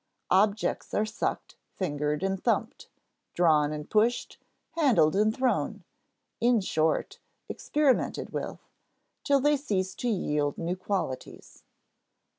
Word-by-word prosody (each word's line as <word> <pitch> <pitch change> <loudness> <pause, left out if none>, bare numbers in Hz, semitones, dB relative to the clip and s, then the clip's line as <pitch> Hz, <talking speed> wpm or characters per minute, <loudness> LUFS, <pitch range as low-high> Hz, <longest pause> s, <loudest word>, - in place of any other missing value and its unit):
Objects 205 +3 +1
are 210 - +2
sucked, 215 - -4 0.2
fingered, 150 -2 -2
and 195 -1 -2
thumped; 230 +3 -1 0.5
drawn 155 -4 +3
and 150 -1 -5
pushed, 225 +3 +1 0.3
handled 255 - +3
and 215 +2 +3
thrown; 255 -1 0 0.6
in 240 0 +3
short, 160 -5 0 0.3
experimented 290 -4 0
with, - - -6 0.6
till 280 -1 +3
they 295 +2 +3
cease 190 -10 -2
to 245 - -3
yield 150 -8 -1
new 170 +2 -2
qualities. 185 -8 -5
195 Hz, 110 wpm, -28 LUFS, 160-240 Hz, 0.6 s, drawn